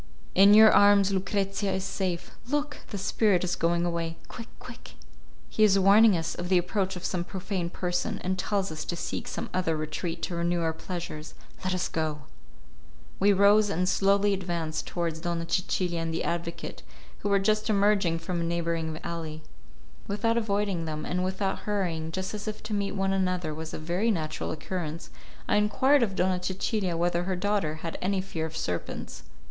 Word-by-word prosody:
In 200 Hz, +2 st, +7 dB
your 220 Hz, 0 st, +9 dB
arms 200 Hz, -1 st, +6 dB
Lucrezia 195 Hz, +1 st, -1 dB
is 190 Hz, 0 st, -2 dB
safe. 185 Hz, -3 st, -3 dB, 0.2 s
Look! 290 Hz, +2 st, -1 dB
the 205 Hz, -, -4 dB
spirit 195 Hz, -1 st, +2 dB
is 180 Hz, -, 0 dB
going 170 Hz, +1 st, +1 dB
away. 165 Hz, -1 st, -2 dB
Quick, 230 Hz, -, -8 dB
quick! -, -, -11 dB, 0.5 s
He 215 Hz, -, +1 dB
is 200 Hz, -2 st, +6 dB
warning 200 Hz, +1 st, +6 dB
us 165 Hz, 0 st, -2 dB
of 175 Hz, 0 st, -5 dB
the 185 Hz, -, +5 dB
approach 190 Hz, +2 st, 0 dB
of 180 Hz, -, -6 dB
some 180 Hz, -2 st, -1 dB
profane 185 Hz, -1 st, -3 dB
person, 175 Hz, 0 st, -2 dB
and 185 Hz, +1 st, 0 dB
tells 195 Hz, 0 st, -1 dB
us 155 Hz, 0 st, -4 dB
to 175 Hz, -, -3 dB
seek -, -, -4 dB
some -, -, -4 dB
other 180 Hz, -3 st, 0 dB
retreat 155 Hz, +2 st, -4 dB
to -, -, -2 dB
renew 170 Hz, 0 st, 0 dB
our 160 Hz, -1 st, 0 dB
pleasures. 165 Hz, -2 st, -6 dB, 0.3 s
Let 185 Hz, 0 st, 0 dB
us 180 Hz, -, 0 dB
go." 155 Hz, -2 st, -2 dB, 1.0 s
We 205 Hz, +1 st, +5 dB
rose 205 Hz, +2 st, +5 dB
and 180 Hz, -1 st, 0 dB
slowly 200 Hz, +1 st, +3 dB
advanced 170 Hz, -4 st, -3 dB
towards 165 Hz, -2 st, -2 dB
Donna 170 Hz, 0 st, -2 dB
Cecilia 175 Hz, 0 st, 0 dB
and 165 Hz, 0 st, -2 dB
the 165 Hz, -, -2 dB
advocate, 170 Hz, 0 st, -4 dB, 0.4 s
who 205 Hz, -, -2 dB
were 200 Hz, -, +4 dB
just 215 Hz, +3 st, +1 dB
emerging 200 Hz, -4 st, +3 dB
from 170 Hz, +1 st, -3 dB
a -, -, -1 dB
neighbouring 165 Hz, -2 st, -2 dB
alley. 160 Hz, -2 st, -5 dB, 0.6 s
Without 220 Hz, +3 st, 0 dB
avoiding 200 Hz, -6 st, 0 dB
them, 155 Hz, -1 st, -4 dB
and 180 Hz, +1 st, -1 dB
without 190 Hz, +1 st, -1 dB
hurrying, 170 Hz, -6 st, -1 dB
just 190 Hz, +4 st, -3 dB
as 210 Hz, 0 st, -6 dB
if 215 Hz, -1 st, -5 dB
to 215 Hz, 0 st, -4 dB
meet 200 Hz, -1 st, -1 dB
one 195 Hz, -1 st, 0 dB
another 180 Hz, -4 st, 0 dB
was 160 Hz, +1 st, -6 dB
a -, -, -5 dB
very 175 Hz, +8 st, 0 dB
natural 155 Hz, -7 st, -2 dB
occurrence, 165 Hz, 0 st, -5 dB, 0.4 s
I -, -, +3 dB
enquired 260 Hz, +7 st, +4 dB
of 200 Hz, -5 st, 0 dB
Donna 185 Hz, -1 st, +1 dB
Cecilia 185 Hz, -1 st, -1 dB
whether 175 Hz, +1 st, +1 dB
her 190 Hz, 0 st, -1 dB
daughter 195 Hz, -4 st, 0 dB
had 165 Hz, -, -4 dB
any 195 Hz, +1 st, +1 dB
fear 165 Hz, -4 st, -3 dB
of 160 Hz, 0 st, -8 dB
serpents. 85 Hz, -7 st, -4 dB
185 Hz, 185 wpm, -28 LUFS, 165-200 Hz, 1.0 s, your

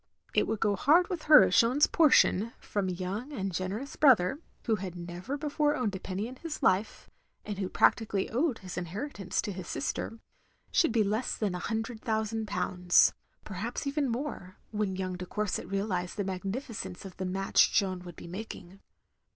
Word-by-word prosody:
It -, -, +3 dB
would 220 Hz, -1 st, -1 dB
go 205 Hz, -2 st, +2 dB
hard 325 Hz, -, +4 dB
with 350 Hz, -5 st, -4 dB
her 300 Hz, -, +10 dB
if -, -, +2 dB
Jeanne's 255 Hz, +5 st, +5 dB
portion, 235 Hz, -, +4 dB
from 200 Hz, -2 st, -2 dB
a -, -, -1 dB
young 190 Hz, +9 st, -4 dB
and 195 Hz, -8 st, -3 dB
generous 195 Hz, +10 st, -4 dB
brother, 260 Hz, -3 st, +4 dB
— -, -, -37 dB
^who 220 Hz, -4 st, +1 dB
had 185 Hz, -2 st, -5 dB
never 175 Hz, +10 st, -5 dB
before 295 Hz, 0 st, +1 dB
owned 220 Hz, -8 st, -1 dB
a -, -, -4 dB
penny 195 Hz, +4 st, -4 dB
in 255 Hz, +1 st, -10 dB
his 325 Hz, 0 st, -6 dB
life, 195 Hz, +4 st, +1 dB, 0.4 s
and 205 Hz, -2 st, -5 dB
who 190 Hz, -2 st, -2 dB
practically 205 Hz, -4 st, +2 dB
owed 260 Hz, +1 st, +1 dB
his 185 Hz, -1 st, -6 dB
inheritance 195 Hz, -, -3 dB
to 210 Hz, -, -3 dB
his 185 Hz, -2 st, -7 dB
sister, 180 Hz, +10 st, -3 dB, 0.3 s
— -, -, -39 dB
should 330 Hz, -, +3 dB
be 225 Hz, -1 st, +3 dB
less 215 Hz, +5 st, -1 dB
than 205 Hz, -4 st, -1 dB
a 180 Hz, -, -3 dB
hundred 225 Hz, +3 st, -3 dB
thousand 220 Hz, -1 st, -1 dB
pounds; 180 Hz, -3 st, +3 dB, 0.3 s
perhaps 215 Hz, +7 st, -4 dB
even 280 Hz, -1 st, 0 dB
more, 230 Hz, -7 st, -4 dB
when 210 Hz, -3 st, -1 dB
young 185 Hz, -1 st, -3 dB
de 180 Hz, 0 st, -7 dB
Courset 210 Hz, 0 st, -2 dB
realised 195 Hz, -2 st, -2 dB
the 205 Hz, -, 0 dB
magnificence 195 Hz, 0 st, -5 dB
of 190 Hz, -, -10 dB
the 190 Hz, -, -3 dB
match 195 Hz, +1 st, +3 dB
Jeanne 185 Hz, -3 st, +1 dB
wotdd 175 Hz, -2 st, -10 dB
be -, -, -10 dB
making. 190 Hz, 0 st, -8 dB
205 Hz, 190 wpm, -30 LUFS, 185-245 Hz, 0.4 s, her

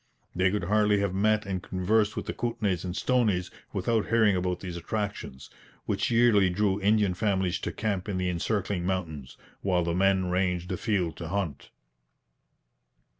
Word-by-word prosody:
They 90 Hz, +1 st, +3 dB
could 100 Hz, 0 st, -1 dB
hardly 105 Hz, +2 st, +3 dB
have 100 Hz, -2 st, -1 dB
met 105 Hz, +2 st, +2 dB
and 95 Hz, -2 st, -3 dB
conversed 105 Hz, +4 st, +1 dB
with -, -, -4 dB
the -, -, -3 dB
Kootenays 110 Hz, -7 st, -1 dB
and 90 Hz, -1 st, -4 dB
Stonies 105 Hz, -8 st, +1 dB, 0.2 s
without 115 Hz, -2 st, 0 dB
hearing 110 Hz, -4 st, +4 dB
about 90 Hz, 0 st, -1 dB
these 90 Hz, -2 st, -6 dB
attractions, 100 Hz, -8 st, -5 dB, 0.3 s
which -, -, 0 dB
yearly 115 Hz, -5 st, +4 dB
drew 100 Hz, +2 st, 0 dB
Indian 105 Hz, -1 st, +3 dB
families 95 Hz, -2 st, 0 dB
to -, -, -3 dB
camp 100 Hz, -2 st, -2 dB
in 95 Hz, -, -2 dB
the 90 Hz, 0 st, -1 dB
encircling 90 Hz, +1 st, -1 dB
mountains, 80 Hz, -8 st, -4 dB, 0.2 s
while 90 Hz, -3 st, +1 dB
the 85 Hz, 0 st, -1 dB
men 95 Hz, 0 st, +2 dB
ranged 90 Hz, -1 st, 0 dB
afield 90 Hz, -5 st, -1 dB
to 85 Hz, -, -6 dB
hunt. 85 Hz, -6 st, -3 dB
95 Hz, 160 wpm, -28 LUFS, 90-105 Hz, 0.3 s, hearing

